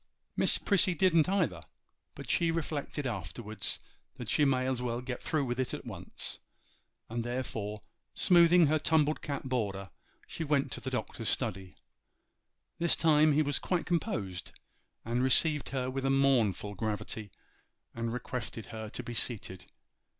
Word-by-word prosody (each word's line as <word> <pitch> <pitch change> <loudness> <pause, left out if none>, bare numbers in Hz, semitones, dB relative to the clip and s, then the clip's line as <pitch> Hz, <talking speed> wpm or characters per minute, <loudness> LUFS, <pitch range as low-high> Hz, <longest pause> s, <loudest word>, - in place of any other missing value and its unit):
Miss - - +4
Prissy 190 -3 +3
didn't 170 -2 +4
either; 165 - +1 0.5
but - - -8
she 170 -1 +2
reflected 150 -3 -2
afterwards 110 0 -3 0.4
that - - -5
she 150 - +4
might 130 -2 +2
as 130 -1 -1
well 120 -1 -1
get 125 0 -5
through 155 -4 0
with 125 0 -2
it 130 - 0
at - - -9
once, - - -6 0.7
and 115 +1 -3
therefore, 115 -4 -4 0.3
smoothing 175 -1 +6
her 155 +1 +2
tumbled 155 -1 +2
cap 140 -2 -4
border, 100 - -2 0.3
she 165 - -5
went 145 -2 +1
to - - -5
the - - -3
Doctor's - - -2
study. 95 0 -2 1.0
This 170 0 +4
time 155 -1 +5
he 155 +2 +4
was 145 -1 +1
quite 180 -2 -1
composed, 100 - -2 0.5
and 120 +2 0
received 145 +3 +3
her 130 -2 -2
with 130 +1 -3
a 135 - +1
mournful 125 -8 +2
gravity, 105 +1 -3 0.6
and 115 0 -3
requested 120 -2 -4
her 110 -1 -5
to 125 - -5
be 120 - -6
seated. 100 -6 -2
130 Hz, 150 wpm, -31 LUFS, 110-155 Hz, 1.0 s, smoothing